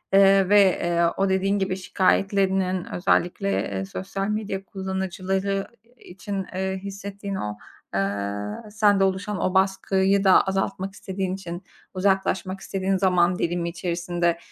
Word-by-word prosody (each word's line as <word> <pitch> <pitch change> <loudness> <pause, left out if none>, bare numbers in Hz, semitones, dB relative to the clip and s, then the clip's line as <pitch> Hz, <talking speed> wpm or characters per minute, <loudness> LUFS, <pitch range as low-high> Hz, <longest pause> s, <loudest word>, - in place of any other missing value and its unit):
ııı, 195 -1 +6
ve, 200 -3 +5 0.2
ııı, 170 0 +3
o, 195 0 +2
dediğin 195 +2 +1
gibi, 190 -1 -1
şikâyetlerinin 190 0 +1
özellikle, 180 +2 +1 0.2
eee, 95 0 -3
sosyal 195 - -4
medya 210 -2 -3
kullanıcıları 190 +1 -2 0.3
i - - -19
için, 195 +1 -5
ııı, 190 0 -1
hissettiğin 200 +1 -6
o, 105 - -4 0.4
ııı, 100 - -3
sende 205 -2 +3
oluşan 195 +2 -1
o 185 - 0
baskıyı 190 +1 +2
da 190 -1 +7
azaltmak 195 0 -2
istediğin 190 -1 -3
için, 175 -1 -7 0.3
uzaklaşmak 190 0 0
istediğin 195 0 -1
zaman 180 -2 +2
dilimi 170 0 -1
içerisinde, 170 0 -1
190 Hz, 130 wpm, -24 LUFS, 180-195 Hz, 0.4 s, da